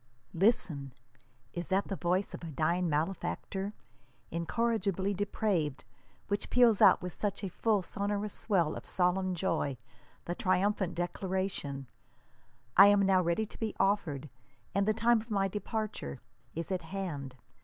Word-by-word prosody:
Listen! 165 - +1 0.6
Is 175 0 -4
that 195 +1 +2
the 195 - -2
voice 180 +2 0
of - - -7
a - - -5
dying 170 +4 +1
malefactor, 190 +5 -2 0.6
incorrigihly 200 +2 0
depraved, 185 -7 -1 0.4
which 205 0 -1
peals 240 -4 +5
out - - +7
with 180 -2 -4
such 205 0 -1
a 195 - -2
full 210 0 +1
sonorous 205 +2 -2
swell 175 -8 +1
of - - -7
solemn 185 +1 +1
joy 155 -6 -1 0.5
the 175 - -2
triumphant 185 0 +1
declaration, 175 -5 -2 0.9
"I 195 +2 +10
am 205 0 +5
now 190 -1 +4
ready 170 +5 +1
to - - -13
he 220 -2 -2
offered, 160 -8 +1 0.5
and 200 +1 +1
the 215 - +4
time 230 0 +3
of 225 - -14
my 195 -2 +2
departure 210 - -4 0.4
is 165 +4 -4
at 185 -1 0
hand. 160 -7 -5
190 Hz, 145 wpm, -31 LUFS, 170-205 Hz, 0.9 s, I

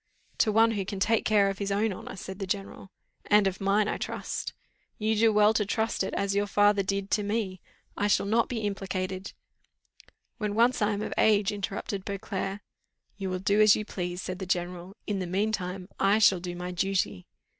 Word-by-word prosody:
"To 220 - +4
one 225 +2 +5
who 205 -3 -1
can 195 +1 -5
take 225 +3 +2
care 205 -2 +4
of 195 0 -3
his 200 -1 -2
own 205 +1 +1
honour," - - -8
said 190 0 -8
the 195 - -4
general. 195 0 -4 0.4
"And 210 -1 +5
of 195 0 -1
mine, 200 +2 +2
I - - -1
trust." - - -4 0.4
"You 220 +1 +1
do 225 +1 +4
well 210 0 +5
to 215 - +2
trust 220 +3 -1
it, - - -3
as 200 0 0
your 205 +1 +1
father 205 +1 +4
did, 195 0 -2
to 210 - +2
me: 205 -3 -2 0.4
it 205 - +1
shall 200 - +3
not 225 +3 +2
be 235 -3 -3
implicated 190 -2 -3 0.5
" - - -29
"When 210 -2 -2
once 235 +2 +3
I 210 0 +2
am 205 +1 -3
of - - -4
age," 210 -2 +4
interrupted 200 0 -4
Beauclerc. 195 0 -4 0.6
"You 195 -2 -3
will 185 - -1
do 200 +3 +2
as 215 -1 +7
you 215 - -3
please," 180 -2 -4
said 185 0 -5
the 190 - -5
general. 180 +2 -3
"In 205 -2 -2
the 185 - -3
mean 200 +5 0
time 185 -2 -4
I 195 +2 +4
shall 200 -4 +5
do 175 0 -5
my 180 +1 -5
duty." 180 - -1
200 Hz, 210 wpm, -28 LUFS, 190-210 Hz, 0.6 s, as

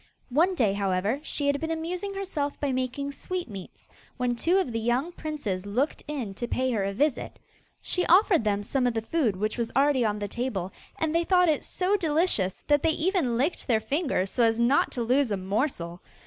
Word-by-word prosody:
One 335 +9 +3
day, 220 - +2
however, 200 +5 0
she 295 -1 -3
had 285 0 +1
been 320 - -2
amusing 355 +5 -3
herself 310 -8 -3
by 285 -2 0
making 260 +2 -2
sweetmeats, 275 - -6 0.3
when 250 -1 0
two 340 +10 +2
of 375 -10 0
the 225 - -2
young 245 +8 0
princes 230 - -4
looked 250 +9 -1
in 260 -9 -4
to 240 +5 -4
pay 255 +1 0
her 215 -4 0
a 195 - -1
visit. 275 +7 -1 0.5
She 360 - 0
offered 360 - +5
them 205 -1 0
some 250 +4 0
of 240 - -1
the 225 - -1
food 240 - 0
which 215 +5 -2
was 230 -1 -1
already 275 -1 +3
on 210 -2 0
the 205 0 -3
table, 200 -5 -3 0.2
and 320 -1 0
they 335 +1 +2
thought 360 -1 +4
it 305 - +1
so 375 +2 0
delicious 310 - +1
that 290 -1 +3
they 325 - +2
even 325 - +1
licked 290 +8 -1
their 230 -4 +3
fingers 270 - -1
so - - 0
as 225 0 +3
not 240 +4 +3
to 240 - -2
lose 255 +2 +2
a 205 - 0
morsel. 190 - -2
260 Hz, 205 wpm, -27 LUFS, 220-320 Hz, 0.5 s, offered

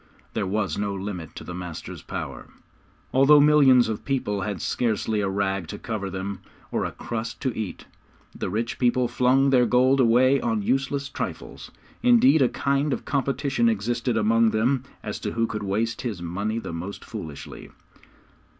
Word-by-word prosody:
There 100 -3 -1
was 105 +2 -1
no 100 -1 -1
limit 95 -4 -6
to - - -8
the 90 - -7
master's 90 -2 -7
power. - - -6 0.7
Although 140 +3 +7
millions 140 -4 +6
of 110 -2 -4
people 115 -7 -1
had 105 -4 -3
scarcely 110 +1 0
a 100 - 0
rag 95 -2 -1
to - - -6
cover 105 -4 -4
them, 95 +1 -5 0.3
or - - 0
a - - -3
crust 115 -1 -5
to 130 -4 -1
eat, 110 -4 -5 0.5
the - - -4
rich 115 +5 -2
people 125 0 +2
flung 130 +3 +3
their 125 -2 +4
gold 130 +3 +4
away 130 +2 +4
on 115 -3 0
useless 135 +4 0
trifles. - - -6 0.3
Indeed, 245 - +5
a 125 - +4
kind 140 +1 0
of - - -5
competition 135 -3 +1
existed 120 +2 -1
among 115 +1 +3
them 125 +5 +1 0.2
as - - -4
to - - -4
who 115 0 +1
could 110 -1 -4
waste 110 +3 -1
his 110 -7 -4
money 100 +6 -3
the 115 - -5
most 90 +5 -6
foolishly. 80 -10 -8
115 Hz, 170 wpm, -25 LUFS, 100-130 Hz, 0.7 s, Although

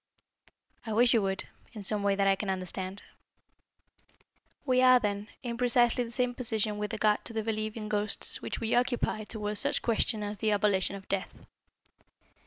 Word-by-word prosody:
"I 220 - -4
wish 240 +3 +4
you 230 - +4
would, 195 -1 -2 0.3
in 210 -3 -7
some 210 +1 +1
way 200 0 +2
that 200 0 +1
I 195 - +4
can 195 +1 -4
understand." 185 +1 -4 1.6
"We 255 -2 +3
are, 255 -1 +7
then, 205 -1 -2 0.2
in 235 -2 -4
precisely 245 0 +3
the 235 - -7
same 250 +1 -1
position 220 -4 -1
with 210 0 -3
regard 210 -1 +1
to - - -7
the 220 -1 -2
belief 215 0 -3
in 215 -1 -5
ghosts 210 0 +1
which - - -4
we 225 0 -1
occupy 245 -3 0
towards 210 -1 -2
such - - +1
questions 225 -2 0
as 205 0 -4
the 215 -1 +1
abolition 200 -2 +1
of 195 -1 -11
death. 195 -1 -4
215 Hz, 180 wpm, -29 LUFS, 205-235 Hz, 1.6 s, are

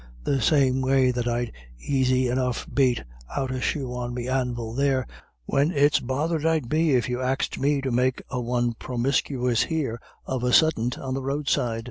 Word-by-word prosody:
The 135 -2 0
same 135 -1 +3
way 130 -1 +3
that 120 -1 -2
I'd 120 0 -1 0.4
aisy 130 -2 +2
enough 125 0 -1
bate 130 -3 +2 0.3
out 135 -2 -1
a 130 -1 -3
shoe 130 -3 -2
on 120 0 -4
me 125 0 -4
anvil 125 -3 -2
there, 135 -1 +1 0.4
when 140 - +2
it's 145 -3 +3
bothered 150 +5 -1
I'd 160 -5 +1
be 155 +1 +2
if 120 -3 +1
you 125 +1 -2
axed 130 +1 -1
me 140 +1 +1
to 135 -1 -2
make 125 +2 +1
a 125 -2 -2
one 120 0 0
promiscuous 125 0 0
here 135 -8 -2 0.2
of 130 -2 -3
a 125 0 +1
suddint 125 -7 +3
on 130 -1 -4
the 135 - -2
roadside." 135 -4 -1
130 Hz, 180 wpm, -25 LUFS, 125-140 Hz, 0.4 s, same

